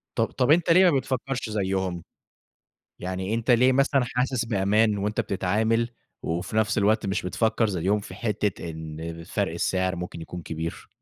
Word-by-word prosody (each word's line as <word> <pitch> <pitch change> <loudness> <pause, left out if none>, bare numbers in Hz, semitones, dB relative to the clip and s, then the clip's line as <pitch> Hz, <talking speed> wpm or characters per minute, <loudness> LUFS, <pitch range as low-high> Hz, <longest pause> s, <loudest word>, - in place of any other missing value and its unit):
طب - - +2
طب 125 +1 +1
أنتَ 170 +2 +4
ليه 180 +1 +7
ما 140 - +2
بتفكرش 130 -2 -3
زيهم؟ 95 -4 -1 0.9
يعني 95 +3 -3
أنتَ 115 +2 -1
ليه 125 +2 +5
مثلًا 135 0 +3
حاسس 125 0 -1
بأمان 105 0 +2
وأنتَ 105 +2 -1
بتتعامل، 110 +5 0 0.3
وفي 90 +5 -3
نفس 110 0 +2
الوقت 105 0 +2
مش 95 +2 -1
بتفكر 110 +5 +1
زيهم 95 +3 0
في - - -10
حتة 105 -6 -2
إن 80 +1 -7
فرْق 100 0 -1
السعر 95 +2 0
ممكن 90 -1 -6
يكون 85 +1 -7
كبير؟ 80 +1 -5
105 Hz, 160 wpm, -25 LUFS, 90-115 Hz, 0.9 s, ليه